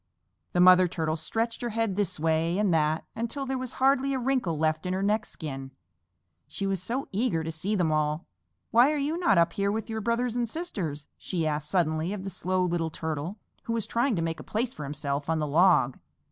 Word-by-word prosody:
The 175 - +1
Mother 185 0 +7
Turtle 160 -2 -1
stretched 225 +8 -2
her 240 - -2
head 225 -3 -1
this 200 -6 0
way 165 +2 +1
and 205 -4 +2
that 155 0 +1
until 235 +5 -3
there 265 0 -2
was 255 -1 -4
hardly 270 +1 +2
a - - 0
wrinkle 250 - 0
left 155 +2 0
in 180 - -1
her 190 +1 -1
neck 210 +2 +1
skin, 135 -4 -6 0.8
she 200 - -4
was 195 -2 -1
so 250 +8 -2
eager 200 -6 0
to 160 - -3
see 185 +7 -2
them 175 -5 +1
all. 155 +1 0 0.5
"Why 245 +5 +6
are 305 - 0
you 295 +4 -1
not 340 - +3
up 170 0 +4
here 200 0 0
with 220 +1 -3
your 220 0 -2
brothers 235 +2 0
and 240 -2 0
sisters?" 185 - -4
she 170 -4 -2
asked 150 -1 -2
suddenly 165 0 +1
of 200 -2 -5
the 195 - -5
Slow 185 +1 0
Little 170 -2 0
Turtle, 160 +4 -4 0.3
who 230 - -1
was 225 -2 -1
trying 235 +2 +1
to 165 - -1
make 165 -1 -2
a - - -8
place 235 +3 -2
for 150 - -6
himself 140 0 -3
on 165 - +2
the 155 - 0
log. 150 -4 +4
185 Hz, 220 wpm, -28 LUFS, 160-230 Hz, 0.8 s, Mother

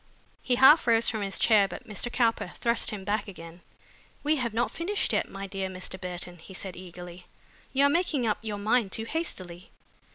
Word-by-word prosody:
He 250 - +1
half 265 +3 +7
rose 230 0 +4
from 220 -2 -1
his 195 -1 -2
chair 210 -3 +5
but 185 - -9
Mr. 215 +3 -2
Cowper 230 -3 +1
thrust 235 0 +1
him 205 -3 -6
back 210 +2 -1
again. 170 -2 -10 0.6
"We 305 +1 +2
have 240 -4 -1
not 235 +3 0
finished 385 +5 -1
yet, - - 0
my 195 0 -6
dear 195 -1 -3
Mr. 185 0 -6
Burton," 180 -1 -5
he 190 +4 -11
said 190 -1 -4
eagerly. 175 0 -10 0.4
"You 275 +1 +4
are - - +5
making 310 -5 +1
up 215 -2 0
your 215 -2 -4
mind 215 0 +1
too 225 - -1
hastily." 185 - -4
210 Hz, 195 wpm, -28 LUFS, 185-240 Hz, 0.6 s, half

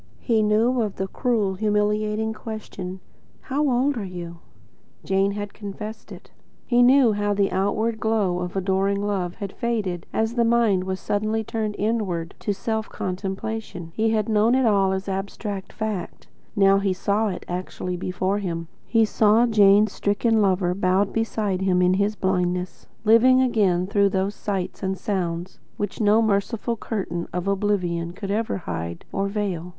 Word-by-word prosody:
He 225 -3 +2
knew 225 +4 +2
of 210 -3 -2
the 190 - -3
cruel, 215 -3 0
humiliating 210 +2 0
question: 205 -4 -7 0.4
"How 290 +1 0
old 260 +2 +1
are 220 - -3
you?" 175 -2 -7 0.6
Jane 195 +1 +1
had 205 0 -5
confessed 210 +1 -7
to - - -9
it. - - -17 0.3
He 240 -1 +3
knew 255 -1 +6
how 205 0 0
the 200 -1 +1
outward 215 +4 0
glow 205 -5 +1
of 180 +1 -4
adoring 195 +1 +1
love 185 -4 -2
had 200 -3 -6
faded 205 -7 -2
as 225 +1 0
the 235 -1 +2
mind 230 -5 +3
was 190 0 -3
suddenly 215 +2 -1
turned 215 -1 -3
inward 200 -6 -1
to 210 - -1
self 220 +2 -2
contemplation. 190 -1 -4
He 220 +3 +1
had 215 -2 +1
known 220 +2 +3
it 260 -1 +3
all 200 -3 +3
as 190 +1 -3
abstract 195 +1 -4
fact. 215 -5 -4 0.3
Now 195 -1 +5
he 195 -1 +1
saw 205 +4 0
it 185 -3 -5
actually 180 0 -4
before 185 +3 -1
him. 165 -4 -4 0.2
He 225 -1 +4
saw 215 +2 +4
Jane's 210 -2 +5
stricken 215 +3 +1
lover, 185 -2 +2
bowed 190 +1 +1
beside 215 -4 -1
him 185 -1 +2
in 180 0 +4
his 200 +2 +1
blindness, 180 -2 -1 0.2
living 240 +4 +6
again 205 -8 +2
through 200 0 +2
those 190 +1 -1
sights 195 -4 -4
and 190 0 -1
sounds 180 -3 -3 0.2
which 205 +2 -3
no 215 +2 +4
merciful 220 +3 0
curtain 190 -6 -4
of 180 +2 -3
oblivion 180 -4 0
could 195 +1 -5
ever 220 +1 -1
hide 85 - -5
or 195 0 -1
veil. 195 -4 -3
200 Hz, 165 wpm, -24 LUFS, 185-220 Hz, 0.6 s, knew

